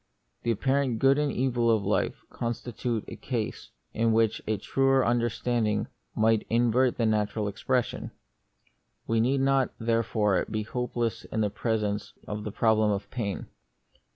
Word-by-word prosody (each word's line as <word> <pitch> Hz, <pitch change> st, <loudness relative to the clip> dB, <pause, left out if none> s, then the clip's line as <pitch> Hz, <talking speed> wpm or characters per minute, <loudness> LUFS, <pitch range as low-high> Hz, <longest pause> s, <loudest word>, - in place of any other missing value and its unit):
The 120 Hz, -, -2 dB
apparent 130 Hz, +2 st, +1 dB
good 135 Hz, +4 st, +4 dB
and 150 Hz, -1 st, +1 dB
evil 120 Hz, -2 st, +1 dB
of 110 Hz, -3 st, +2 dB
life 105 Hz, -, 0 dB
constitute 115 Hz, -1 st, -3 dB
a -, -, -7 dB
case 120 Hz, -5 st, -4 dB, 0.2 s
in 115 Hz, 0 st, +2 dB
which 110 Hz, -1 st, +2 dB
a 110 Hz, -1 st, +1 dB
truer 135 Hz, +3 st, +2 dB
understand 120 Hz, 0 st, +1 dB
ing 105 Hz, -1 st, 0 dB, 0.3 s
might 110 Hz, 0 st, +2 dB
invert 120 Hz, +2 st, +3 dB
the 115 Hz, -, +1 dB
natural 105 Hz, 0 st, +1 dB
impression. 125 Hz, +5 st, -1 dB, 1.0 s
We 115 Hz, 0 st, +1 dB
need 135 Hz, +3 st, +2 dB
not, 135 Hz, -1 st, +2 dB
therefore, 115 Hz, -4 st, +1 dB
be 110 Hz, -1 st, -2 dB
hopeless 115 Hz, -1 st, -2 dB
in 110 Hz, -1 st, 0 dB
presence 105 Hz, -2 st, -1 dB
of 105 Hz, 0 st, -4 dB
the 105 Hz, -, -3 dB
problem 110 Hz, 0 st, +3 dB
of 100 Hz, -1 st, -2 dB
pain. 105 Hz, -6 st, -3 dB
115 Hz, 145 wpm, -28 LUFS, 110-125 Hz, 1.0 s, good